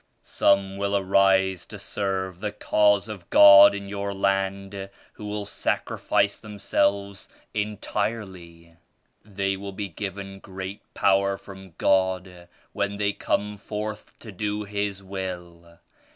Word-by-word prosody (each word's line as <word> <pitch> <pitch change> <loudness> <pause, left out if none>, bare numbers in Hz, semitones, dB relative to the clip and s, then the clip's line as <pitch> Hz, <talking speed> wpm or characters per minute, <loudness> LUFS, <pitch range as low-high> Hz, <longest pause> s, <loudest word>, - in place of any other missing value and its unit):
Some 100 -1 +2
will 100 0 0
arise 95 -1 +2
to 105 - -9
serve 95 -2 -3
the 105 +1 -3
Cause 105 0 +2
of 100 -5 -9
God 100 0 +9
in 100 0 -6
your 100 0 -4
land 95 0 -1 0.2
who 105 - -9
will 105 0 -4
sacrifice 100 0 0
themselves 100 -2 -1 0.2
entirely. 100 -5 -4 0.5
They 100 -2 -2
will 100 0 -7
be 100 0 -4
given 95 +2 -6
great 95 +1 -7
power 100 0 +2
from 95 -3 -13
God 95 -2 0 0.3
when 100 0 -2
they 100 -1 0
come 105 +1 -2
forth 105 +1 -6
to 110 - -9
do 105 +2 -3
His 100 -1 -3
Will. 90 -3 -7
100 Hz, 125 wpm, -25 LUFS, 95-100 Hz, 0.5 s, God